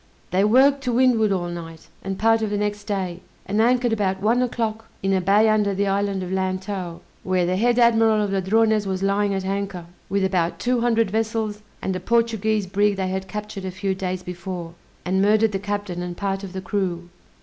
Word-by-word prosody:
They 185 +2 +3
worked 270 +6 +5
to 250 - +1
windward 235 -4 +3
all 175 -2 -1
night 165 -2 -8 0.2
and 195 0 -3
part 225 +2 +3
of 215 - -1
the 205 - -1
next 205 0 -2
day, 190 -4 -3 0.3
and 205 +3 +1
anchored 245 0 +3
about 190 -3 0
one 225 +5 +2
o'clock 225 -2 -2 0.2
in 195 0 +2
a 190 - +2
bay 205 +4 +4
under 210 -2 +2
the 200 +1 +1
island 195 -1 0
of 180 - -6
Lantow, 185 -2 -3 0.2
where 185 -1 +1
the 180 +1 0
head 240 +4 +2
admiral 225 -2 +4
of 205 -2 0
Ladrones 215 +2 +2
was 190 0 -2
lying 200 +1 +1
at 190 -1 -3
anchor, 195 -2 -3 0.2
with 200 0 +1
about 180 -3 0
two 245 -1 0
hundred 230 -4 +2
vessels 220 -1 -1 0.2
and 190 - -1
a - - -2
Portuguese 220 0 +1
brig 205 +2 +1
they 190 -1 -2
had 190 0 -3
captured 210 -2 -6
a 190 - -3
few 185 +1 -2
days 185 -1 -4
before, 180 -1 -6 0.3
and 190 +1 +1
murdered 215 +2 +4
the 195 - -2
captain 205 -3 -3
and 175 -1 -5
part 195 -1 -2
of 190 -2 -7
the 190 - -4
crew. 180 -3 -2
200 Hz, 205 wpm, -23 LUFS, 190-220 Hz, 0.3 s, worked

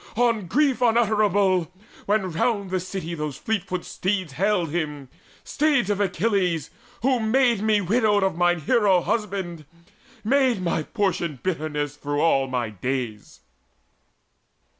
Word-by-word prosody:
on 230 -5 +1
grief 275 - +1
unutterable, 205 -6 +2 0.4
When 200 -3 +1
round 200 +3 -1
the 185 - 0
city 180 -2 -5
those 150 -4 -4
fleet 220 -4 -2
footed 185 -2 -4
steeds 185 -5 -2
Haled 180 0 0
him, 150 -5 -3 0.3
steeds 280 -8 +1
of 205 - -1
Achilles, 185 -4 0 0.3
who 260 -1 +2
had 220 - -2
made 245 -3 +3
Me 215 -1 +2
widowed 205 +1 +2
of 190 -3 0
mine 175 -1 +2
hero 200 - +3
husband, 190 -6 -3 0.6
made 260 -1 +2
My 170 -3 -1
portion 170 - -2
bitterness 150 -5 -2
through 145 0 -3
all 135 -4 +3
my 125 -4 -2
days." 120 0 -4
190 Hz, 135 wpm, -24 LUFS, 160-220 Hz, 0.6 s, made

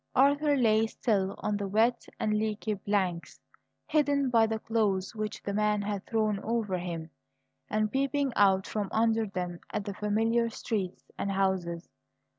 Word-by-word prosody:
Arthur 285 +2 +4
lay 225 -3 +3
still 200 -4 0
on 210 -1 0
the 200 -1 -3
wet 225 +5 +2
and 215 - +1
leaky 215 0 -1
planks, 190 -4 -2 0.5
hidden 285 -3 +2
by 225 -2 +5
the 220 0 -1
clothes 210 -4 0
which 215 -1 -4
the 200 - -3
man 210 0 +1
had 200 -1 -3
thrown 215 -3 +1
over 215 -4 -1
him, 170 -2 -5 0.6
and 215 0 0
peeping 275 0 0
out 190 -1 +4
from 205 -3 -3
under 225 0 +2
them 180 -3 -4
at 210 -2 -3
the 200 - -4
familiar 225 +3 +1
streets 195 -5 -4
and 200 - -1
houses. 190 -3 -1
210 Hz, 155 wpm, -29 LUFS, 195-225 Hz, 0.6 s, by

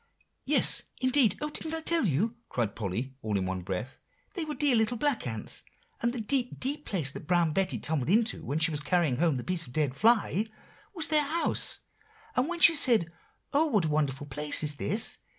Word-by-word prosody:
"Yes, - - +6 0.2
indeed; 255 -6 +3
oh! 300 0 -2
didn't 320 +1 -4
I 325 - -2
tell 330 -7 +1
you?" 205 - 0
cried 115 -5 -2
Polly, 115 +6 -4
all 105 -2 -2
in 95 - -1
one 95 0 -3
breath; 95 +8 -5 0.3
"they 355 - -1
were 300 -1 -5
dear 290 -4 +3
little 225 +2 +1
black 275 - -1
ants, 110 -2 -3 0.4
and 235 - +1
the 245 - -5
deep, 245 +3 -1
deep 290 +3 -3
place 160 -9 -1
that 145 - -10
Brown 175 -3 +2
Betty 185 -9 0
tumbled 145 +4 -1
into 220 +3 +1
when 140 +4 -3
she 160 +1 +2
was 150 - -1
carrying 150 -4 0
home 160 -2 +1
the 125 - -5
piece 180 -2 0
of - - -12
a - - -14
dead 145 -3 0
fly, 220 +2 +2 0.5
was 320 -4 -1
their 305 -1 +4
house. 315 +4 0 0.5
And 255 - +1
when 345 -1 -4
she 335 - +8
said 230 - +4 0.4
'Oh, 305 +3 +3
what 210 - +1
a - - -1
wonderful 145 -2 -1
place 150 +2 0
is 145 -1 0
this! 210 +9 0
180 Hz, 210 wpm, -28 LUFS, -, 0.5 s, she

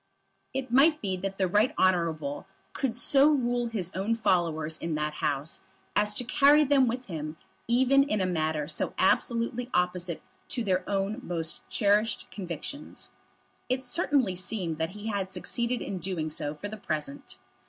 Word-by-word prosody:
It 265 -2 -4
might 300 +5 +5
be 190 -2 -2
that 195 +1 -4
the 190 - +2
Right 210 +10 +2
Honourable 165 -5 +1 0.3
could 260 -5 -1
so 275 +3 +4
rule 245 -4 +1
his 195 -6 -3
own 200 +5 0
followers 165 -7 0
in 165 -2 -2
that 150 0 -1
House 145 +2 -1 0.4
as 210 0 +2
to 250 - 0
carry 280 +4 +5
them 275 -2 +4
with 250 +2 -2
him 155 -4 -5 0.3
even 260 +3 +4
in 275 -7 0
a 190 - +1
matter 155 -4 -1
so - - -2
absolutely 235 +5 +1
opposite 180 -1 -1 0.2
to 240 - -2
their 185 -3 +1
own 200 +3 -1
most 165 -7 -2
cherished 210 +2 +2
convictions. 195 - -6 0.6
It 255 +1 0
certainly 255 - +1
seemed 180 -3 -2
that 160 0 0
he 210 +2 -5
had 195 -3 -2
succeeded 235 +6 -1
in 190 - -4
doing 170 -3 -2
so 150 -1 -2
for 205 - -6
the 215 +1 -7
present. 150 - -4
195 Hz, 165 wpm, -28 LUFS, 170-245 Hz, 0.6 s, might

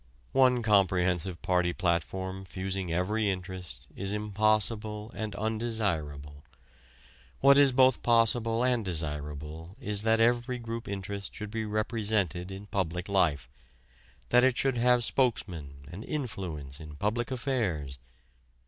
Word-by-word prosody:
One 125 -2 +4
comprehensive 95 -4 +2
party 90 -1 +1
platform 95 +2 -1
fusing 95 -1 -3
every 100 +5 0
interest 90 -9 -5
is 100 +1 -2
impossible 105 +1 0
and 110 -2 -4
undesirable. 95 -11 -2 1.0
What 140 +1 +7
is 140 -2 +6
both 130 0 +4
possible 115 0 +3
and 125 -3 +2
desirable 80 +1 -4
is 105 0 +1
that 110 +1 +3
every 120 +2 +2
group 115 0 -6
interest 100 0 -5
should 105 -1 -6
be 110 0 -2
represented 105 -5 -1
in 95 +1 -8
public 90 -3 -2
life 80 -9 +1 0.8
that 125 0 +5
it 130 -2 +3
should 135 -2 +2
have 125 0 +4
spokesmen 85 - -1
and 95 +5 -7
influence 90 - -5
in 75 -2 -10
public 110 +8 -1
affairs. 105 - -2
100 Hz, 120 wpm, -29 LUFS, 90-115 Hz, 1.0 s, What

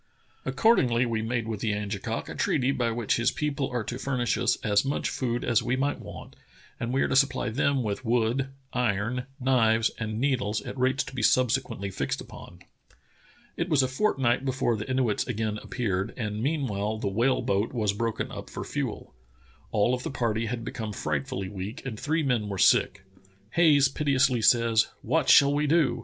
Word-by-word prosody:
Accord 230 +1 +4
ingly 120 -1 +2
we 115 -2 -1
made 115 0 -2
with 110 -2 -3
the 105 -1 0
Angekok 105 -1 -3
a - - -6
treaty 130 +1 +1
by 125 -3 0
which 115 -1 0
his 120 - +2
people 145 -3 -2
are 120 -2 -2
to 120 +3 -5
furnish 125 -3 0
as 105 -4 +1
much 140 +1 -1
food 120 -2 -2
as 120 -2 +2
we 125 - 0
might 140 +2 -1
want, - - -10 0.4
and 115 - -3
we 135 +1 +2
are - - +1
to - - -1
supply 135 -3 +2
them 135 +4 +1
with 105 +3 -3
wood, 120 +3 +1 0.2
iron, 125 +1 -1
knives, 115 -4 +3
and 110 -1 -3
needles 120 -6 0
at - - -7
rates 130 +1 +1
to - - -10
be 130 - -3
subsequently 115 -4 +1
fixed - - -2
upon." - - -12 0.9
It 170 - -2
was 145 -5 +4
a - - +1
fortnight 130 - +1
before 130 -3 0
the 105 +2 -6
Inuits 130 -5 0
again 105 0 -2
appeared, 100 -4 -2
and 105 -3 -3
meanwhile 110 -7 -1
the 110 - -3
whale 120 +7 +1
boat 100 +3 0
was 105 -5 0
broken 115 +2 -2
up - - -8
for - - -6
fuel. - - -4 0.6
All 110 +2 +2
of 125 - -1
the - - -4
party 115 -4 -1
had 115 0 -4
become 110 -3 -5
frightfully 75 +3 -3
weak 100 +8 -7
and 110 -5 -5
three 160 +2 0
men 120 -6 0
v/ere 100 -1 -4
sick. 95 +1 +3 0.5
Haj^es 145 -5 +5
piteously 140 -4 +2
says: 115 -1 +4 0.2
"What - - +1
shall 140 0 +7
we 150 +1 +1
do? 145 -6 +2
120 Hz, 185 wpm, -27 LUFS, 110-135 Hz, 0.9 s, shall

